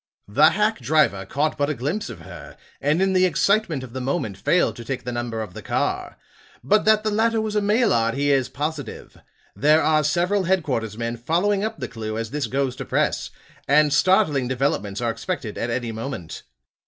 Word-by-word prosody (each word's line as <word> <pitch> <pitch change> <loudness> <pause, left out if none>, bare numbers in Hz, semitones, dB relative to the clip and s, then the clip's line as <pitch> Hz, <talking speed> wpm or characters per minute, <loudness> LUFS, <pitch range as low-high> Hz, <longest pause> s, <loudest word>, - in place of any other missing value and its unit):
"The 145 +10 +5
hack 210 +4 0
driver 100 -12 +1
caught 150 +6 -1
but 145 0 +1
a 150 - -1
glimpse 150 - -3
of - - -9
her, - - -11 0.2
and 155 +6 +2
in 190 0 +1
the 185 0 +4
excitement 185 -5 +1
of 120 -2 -10
the 130 - -4
moment 125 - -2
failed 170 - +1
to 120 - -7
take 125 +2 -4
the 125 - -4
number 120 -2 -3
of 105 - -10
the - - -8
car. - - -2 0.5
But 210 - +3
that 215 0 +4
the 215 - 0
latter 225 +2 +2
was 215 -1 -2
a 210 - +2
Maillard 200 - +2
he 145 +1 +1
is 135 -3 +2
positive. 150 +1 -5 0.4
There 155 +2 +4
are 155 -1 +3
several 175 +6 +1
headquarter's 130 - -1
men 115 0 -3
following 180 - +1
up 220 -1 -3
the 130 -4 -4
clew 110 -1 -5
as 115 0 -4
this 145 -4 -2
goes 130 +1 -1
to - - -5
press; - - 0 0.4
and 150 +1 +4
startling 150 -6 +3
developments 120 -6 -1
are 120 -1 0
expected 120 - -4
at 115 - -3
any 120 0 -2
moment. 110 - -6
145 Hz, 200 wpm, -23 LUFS, 120-185 Hz, 0.5 s, The